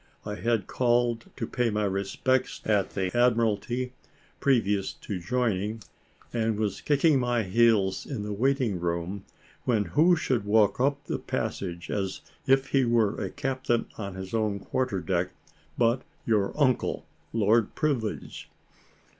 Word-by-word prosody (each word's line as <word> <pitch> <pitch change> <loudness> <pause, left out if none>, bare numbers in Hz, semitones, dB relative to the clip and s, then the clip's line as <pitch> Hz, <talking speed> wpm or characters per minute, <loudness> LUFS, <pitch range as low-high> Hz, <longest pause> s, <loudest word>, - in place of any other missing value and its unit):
I 105 - -3
had 115 -2 0
called 120 -1 +1
to - - -2
pay 125 -2 0
my 105 0 0
respects 100 +6 0
at 100 -3 +1
the 95 +1 -1
Admiralty, 120 +1 +1 0.5
previous 105 -7 +2
to 100 -3 -6
joining, 110 +1 -1 0.5
and 115 -2 0
was 105 -3 -2
kicking 145 0 +3
my 120 -2 +1
heels 105 -1 +2
in 125 -8 -4
the 105 0 -3
waiting 125 -3 +1
room, 85 +3 -3 0.4
when 110 -4 +2
who 160 - +4
should 130 -8 0
walk 105 0 +3
up 140 +2 +1
the - - -2
passage, 85 -3 -4
as 95 -2 -2 0.3
if 135 0 +3
he 135 -1 +3
were 115 -3 +2
a - - -2
captain 130 -3 -1
on 100 -3 -6
his 95 +1 -7
own 110 -3 +1
quarter 125 -3 -1
deck, 90 +2 -1 0.4
but 120 +2 +3 0.2
your 105 -4 +2
uncle, 130 -5 +1 0.3
Lord 110 0 +2
Privilege. 130 -8 -2
110 Hz, 140 wpm, -27 LUFS, 100-125 Hz, 0.5 s, who